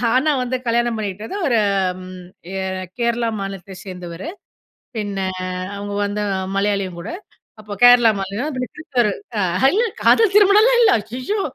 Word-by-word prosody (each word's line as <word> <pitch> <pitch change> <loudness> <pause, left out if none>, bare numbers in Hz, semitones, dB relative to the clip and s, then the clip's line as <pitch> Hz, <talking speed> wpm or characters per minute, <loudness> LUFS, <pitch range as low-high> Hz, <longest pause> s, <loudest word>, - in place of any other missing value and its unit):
ஆனா, 295 +4 +3
வந்து 255 +1 -2
கல்யாணம் 235 0 +1
பண்ணிகிட்டது 210 - -5
ஒரு, 235 -4 +3 0.4
ம். 185 0 -10 0.3
எ - - -2 0.4
கேரளா 235 0 +1
மாநிலத்தைச் 195 -1 -7
சேர்ந்தவரு. 180 - -7 0.7
பின்ன 205 -2 -3 0.6
அவங்க 205 0 -5
வந்து 210 +1 -3 0.4
மலையாளியும் 200 -3 -1
கூட, - - -6 0.5
அப்ப 210 -1 -7
கேரளா 245 -2 +8
மாநிலம், 205 +10 -3 0.2
கிறிஸ்தவர் 245 -8 0 0.3
அ - - +2 0.3
இல்ல 455 - +3 0.2
காதல் 440 -4 +5
திருமணம்லாம் 425 +4 +6
இல்ல. 460 - +6
ஐய்யய்யோ! 255 - -4
225 Hz, 130 wpm, -20 LUFS, 195-260 Hz, 0.7 s, கேரளா